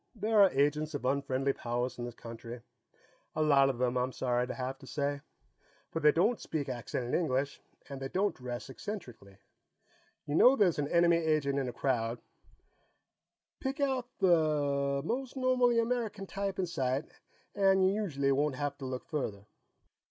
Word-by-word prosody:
There 215 0 +3
are 195 - +8
agents 150 +1 +1
of 135 - -4
unfriendly 135 0 0
powers 120 +1 -3
in 120 - -3
this 120 -1 -7
country 115 +1 -9 0.7
a 155 - +2
lot 140 -3 +5
of 130 - -2
them, 125 0 0
I'm 125 +1 0
sorry 125 -1 0
to - - -4
have 130 +1 -4
to 135 - -13
say. 140 0 -2 0.7
But 165 - -3
they 150 -1 +7
don't 205 +9 +2
speak 150 -3 -3
accented 120 0 -4
English, 140 -4 0 0.3
and 135 -1 -7
they 135 - -2
don't 195 +8 0
dress 125 -1 -6
eccentrically. 125 - -8 0.9
You 145 - -4
know 250 - +7
there's 185 - +3
an 145 - 0
enemy 170 +1 +4
agent 155 -4 +1
in 130 -2 -2
a - - -4
crowd, 120 -3 -1 1.4
pick 270 +1 -3
out 265 -3 0
the 145 -5 +2
most 260 +6 -3
normally 250 -2 +3
American 230 -4 -1
type 195 0 -3
in 190 - 0
sight 135 -4 -1 0.5
and 195 -1 +4
you 190 - +3
usually 145 -10 0
won't 145 0 +1
have 145 +1 -3
to 135 - -6
look 130 -1 -5
further." 105 -10 -4
145 Hz, 165 wpm, -31 LUFS, 130-190 Hz, 1.4 s, are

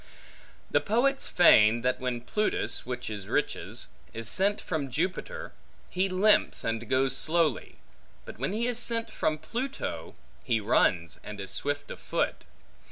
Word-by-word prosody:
The - - +3
poets 265 +6 +1
feign, 115 -9 +6
that 125 +1 0
when 125 -2 -2
Plutus 210 - -1
(which 125 -1 -4
is 105 -3 -5
Riches) - - -2 0.3
is 115 -1 -2
sent 200 - +3
from 150 -5 -3
Jupiter, 185 - -3 0.4
he 185 +2 +1
limps 195 +3 +3
and 115 0 -3
goes 130 0 +2
slowly; 160 -4 0 0.5
but - - -10
when 135 +6 -1
he 225 +3 -1
is 245 -1 0
sent 230 -1 +1
from 155 -1 0
Pluto, 245 - -5 0.3
he 115 -3 +1
runs, 90 -5 +1
and 105 -1 -8
is 95 - -5
swift 145 0 -2
of - - -8
foot. - - -2
150 Hz, 150 wpm, -28 LUFS, -, 0.5 s, feign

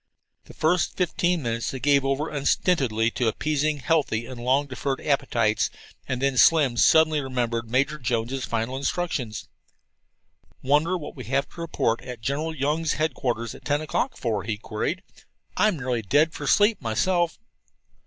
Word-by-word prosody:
The - - -14
first 160 +3 +1
fifteen 175 -2 0
minutes 115 0 -2
they 130 - -5
gave 140 +1 +3
over 135 +3 0
unstintedly 135 -6 +1
to 120 - -1
appeasing 150 +5 0
healthy 135 -6 0
and 120 -1 -8
long 135 +3 +2
deferred 135 0 -3
appetites, 120 -7 +1 0.4
and 130 - -2
then 135 -1 +1
Slim 150 -7 +5
suddenly 155 +1 +5
remembered 120 -3 -2
Major 140 +5 +1
Jones' 120 +1 -2
final 115 +2 -2
instructions. 135 - -3 1.2
"Wonder 150 +7 +2
what 155 - -8
we 130 - -8
have 135 +2 0
to 170 - -10
report 120 -8 -1
at 125 -2 -8
General 150 +7 -2
Young's 150 +3 0
headquarters 125 -7 -2
at - - -13
ten 145 0 +1
o'clock 155 -1 -2
for?" 110 -4 -1
he 110 -1 -3
queried. 115 - -3 0.5
"I'm 210 -5 +2
nearly 125 -3 -2
dead 145 - +2
for 145 - -6
sleep 205 +6 +4
myself." 165 +9 0
135 Hz, 155 wpm, -25 LUFS, 120-155 Hz, 1.2 s, Slim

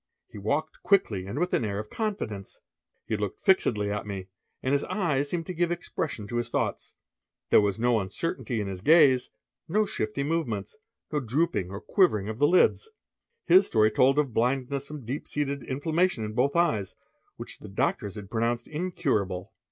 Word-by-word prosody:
He 105 - -9
walked 145 +10 -2
quickly 105 - +2
and 100 - -5
with 180 +3 0
an - - +2
air 100 -2 -2
of 105 +1 -6
confidence. 195 - -4 0.5
He 110 - -1
looked 105 -2 -3
fixedly 105 - +2
at 105 0 -3
me, 95 -2 -6 0.3
and 130 - +1
his 140 - +2
eyes 145 -8 0
seemed 170 0 -2
to 185 - -5
give 175 0 +1
expression 160 -9 -3
to 120 - -3
his 120 0 -2
thoughts. - - -2 0.6
There - - +7
was 100 -1 0
no 120 0 +2
uncertainty 120 - -3
in 105 - -2
his 95 -2 -5
gaze, 140 - +5 0.4
no 210 +6 +2
shifty 110 - -2
movements, 135 - -2 0.4
no 150 - +1
drooping 130 - 0
or 100 +1 -6
quivering 110 - +2
of 110 +2 -5
the 145 - +5
lids. 185 - +3 0.6
His 190 +3 +6
story 110 -1 +3
told 130 +6 +4
of 140 -5 +1
blindness 135 +4 0
from 150 -5 -8
deep 130 +6 -4
seated 140 -1 -2
inflammation 155 0 0
in 105 - -5
both 135 +6 +1
eyes, 115 - +1 0.4
which - - -8
the - - -10
doctors 100 -1 -1
had 105 -1 -9
pronounced 120 +1 0
incurable. 130 - -2
125 Hz, 180 wpm, -27 LUFS, 105-160 Hz, 0.6 s, There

